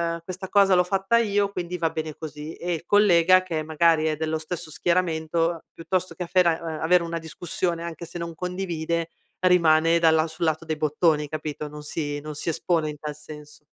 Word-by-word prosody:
ehm, 170 - -9
questa 185 +1 -7
cosa 200 -2 +5
l'ho 180 - +5
fatta 195 +5 +1
io, 205 -3 +1
quindi 180 -1 -4
va 165 -2 0
bene 155 -1 -4
così." 155 0 -8
E 175 0 -3
il 165 - -5
collega, 185 -3 +5
che 165 -4 -3
magari 160 0 +2
è 155 -1 +1
dello 160 0 -2
stesso 160 0 -6
schieramento, 165 -1 0
piuttosto 185 +2 -2
che 180 - -4
affera 170 -2 +3
ehm, 160 -2 -6
avere 175 +2 +4
una 170 0 -3
discussione 170 +1 -3
anche 170 0 -6
se 170 - -8
non 170 -1 -5
condivide, 170 -2 -3 0.3
rimane 170 -2 +4
dalla 160 -1 +4
sul 160 +1 -6
lato 160 +1 0
dei 160 - -2
bottoni, 150 0 +1
capito, 155 -1 -5
non 150 0 -9
si 145 -1 -3
non 150 +1 -7
si 160 - -3
espone 160 -1 0
in 150 - -7
tal 150 -1 -5
senso. 150 0 -12
165 Hz, 195 wpm, -25 LUFS, 155-180 Hz, 0.3 s, cosa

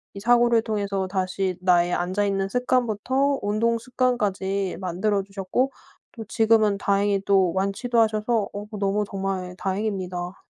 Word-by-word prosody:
이 - - -6
사고를 235 +1 +4
통해서 200 -3 -2
다시 185 0 -1
나의 175 -1 +3
앉아 185 +4 0
있는 195 -1 -1
습관부터 250 +3 0
운동 220 +3 +1
습관까지 205 -6 -1
만들어 195 +3 0
주셨고 195 +7 -2 0.4
또 225 - -7
지금은 220 -2 +3
다행히 200 0 +1
또 190 -3 +3
완치도 200 +5 0
하셔서 220 0 +1
어 205 +1 -5
너무 200 +1 +1
정말 190 -2 -3
다행입니다. 190 -3 -3
200 Hz, 310 characters per minute, -24 LUFS, 190-225 Hz, 0.4 s, 사고를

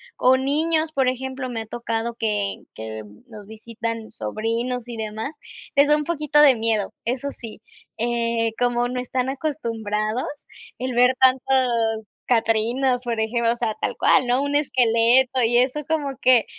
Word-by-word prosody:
o 260 +1 +4
niños, 310 +4 +1
por 265 -4 +2
ejemplo, 260 +1 -4
me 230 -2 -4
ha - - -7
tocado 230 +1 -3
que 210 -3 -1 0.2
que 110 0 -6 0.3
nos 210 -3 -11
visitan 230 0 -6
sobrinos 230 - -3
y 240 - -6
demás, 220 +4 -4 0.4
les 280 +1 +5
da 300 - +5
un 300 - -2
poquito 300 -2 +1
de 290 -3 +7
miedo. 220 -3 0
Eso 255 +4 -2
sí, 225 -5 -10 0.4
eh, 230 -1 0
como 245 0 +1
no 250 0 -3
están 255 +1 -2
acostumbrados 230 -6 -2 0.5
el 255 0 -3
ver 250 +1 +4
tantos 250 -4 +2 0.2
catrinas, 240 +2 +1
por 235 -2 -2
ejemplo, 230 +1 +1
o - - 0
sea, 225 -3 -2
tal - - -2
cual, - - +4
¿no?, 245 +2 +1
un 285 0 -1
esqueleto 250 -1 +3
y 235 +1 +3
eso 255 +4 +1
como 300 -3 0
que 250 -3 +5
240 Hz, 160 wpm, -22 LUFS, 225-260 Hz, 0.5 s, de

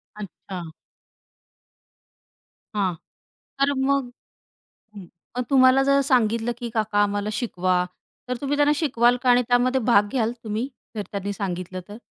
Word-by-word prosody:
अच्छा. 195 -2 -8 2.1
हां, 195 -3 +1 0.7
तर 280 +1 +3
मग 265 -1 +1 0.8
हं. 200 -3 -10 0.3
पण 250 - -1
तुम्हाला 260 0 +6
जर 275 +1 +3
सांगितलं 230 -1 +2
की, 240 -1 -5
"काका 215 -2 -1
आम्हाला 205 0 -1
शिकवा" 185 -5 0 0.4
तर 250 - -1
तुम्ही 285 +1 -1
त्यांना 290 0 +4
शिकवाल 245 -5 +3
का 255 - +3
आणि 245 0 +5
त्यामध्ये 250 +2 +3
भाग 205 -2 +5
घ्याल 230 -3 +1
तुम्ही? 220 +4 -2 0.3
जर 210 - -3
त्यांनी 200 0 -3
सांगितलं 185 -2 -4
तर? 205 - -9
230 Hz, 135 wpm, -24 LUFS, 205-260 Hz, 2.1 s, तुम्हाला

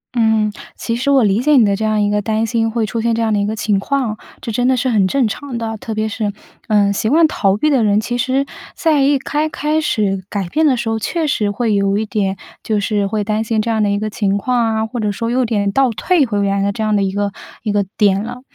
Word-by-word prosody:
嗯， 220 -2 +2 0.3
其 230 - -2
实 255 +4 -1
我 275 -3 +5
理 200 0 +2
解 300 +4 +3
你 235 - +6
的 200 -1 +2
这 215 - -4
样 215 -1 +1
一 205 - +2
个 210 - +1
担 220 +1 0
心 225 0 0
会 225 0 -1
出 225 +2 -3
现 230 0 +1
这 230 - -1
样 220 -1 +1
的 205 - +1
一 200 - 0
个 215 - -2
情 210 -2 0
况， 240 -2 -2 0.2
这 230 - -4
真 245 +3 +1
的 260 0 +3
是 255 - 0
很 205 -5 +3
正 260 +3 +1
常 260 +3 -5
的， 225 -1 -3
特 220 +1 -6
别 215 0 0
是 215 -1 -2 0.4
嗯， 205 -2 +3
习 215 +2 -1
惯 320 +4 +5
逃 195 -9 +1
避 305 +8 +1
的 260 -5 +3
人， 210 0 +3
其 240 +2 -3
实 265 +3 +1 0.3
在 310 -4 +2
一 280 +1 +3
开 300 +3 -2
开 305 +1 -1
始 200 -9 0
改 200 -3 -3
变 315 - +2
的 260 -3 +2
时 235 -1 -3
候， 225 0 0
确 325 - -2
实 215 -9 0
会 220 +1 0
有 200 0 +1
一 220 - -1
点 195 -3 -1 0.2
就 215 -2 -1
是 205 0 0
会 210 +1 -1
担 215 +1 -1
心 225 0 -1
这 230 +2 0
样 220 -1 +1
的 205 - +2
一 200 - +1
个 215 +1 -2
情 200 -2 0
况 230 0 0
啊， 220 0 0
或 235 +2 -5
者 210 -1 0
说 230 +3 -3
有点 225 -5 +1
倒 270 +4 +3
退 290 - +1
回 205 -3 -1
原 200 0 0
来 - - 0
的 200 - +1
这 220 +2 -4
样 215 -1 +1
的 200 - +2
一 195 -1 0
个 205 0 -1 0.3
一 215 - -1
个 205 0 +2
点 200 -2 +3
了。 245 +2 -7
220 Hz, 300 characters per minute, -17 LUFS, 205-245 Hz, 0.4 s, 你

